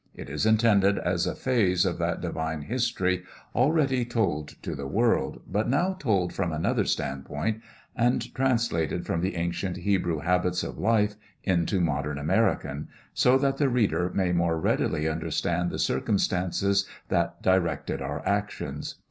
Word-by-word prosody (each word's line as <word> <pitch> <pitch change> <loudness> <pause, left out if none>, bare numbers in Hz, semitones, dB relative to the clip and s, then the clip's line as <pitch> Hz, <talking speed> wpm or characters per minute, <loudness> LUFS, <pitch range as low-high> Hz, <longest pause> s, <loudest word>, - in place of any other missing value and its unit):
It - - -8
is 75 +9 0
intended 105 -3 +4
as 90 -1 0
a - - -2
phase 105 -9 +2
of - - -1
that - - -1
divine 80 -1 -3
history 100 - 0 0.3
already 135 -2 +2
told 100 -11 -1 0.2
to - - -3
the 70 -1 -5
world, 110 - +1
but 105 +5 -1
now 175 +9 +2
told 100 - 0
from 90 -3 -1
another 80 +1 0
stand 65 0 -2
point 110 +10 -2 0.3
and 120 +1 +1
translated 115 - 0
from 85 - -1
the 95 +2 -1
ancient 85 +2 -2
Hebrew 95 -5 0
habits 90 +1 +1
of - - -6
life 105 -1 +2 0.3
into 95 +1 +1
modern 75 -3 -1
American, 75 0 0 0.3
so 125 +1 +4
that 135 0 +1
the 140 -2 +2
reader 105 -7 +1
may 95 -2 +1
more 85 -2 +1
readily 80 0 +1
understand 85 +2 -1
the - - -4
circumstances 95 - +1 0.2
that - - 0
directed 85 -7 +1
our 70 +3 -4
actions. 100 +1 -2
95 Hz, 150 wpm, -27 LUFS, 80-115 Hz, 0.3 s, intended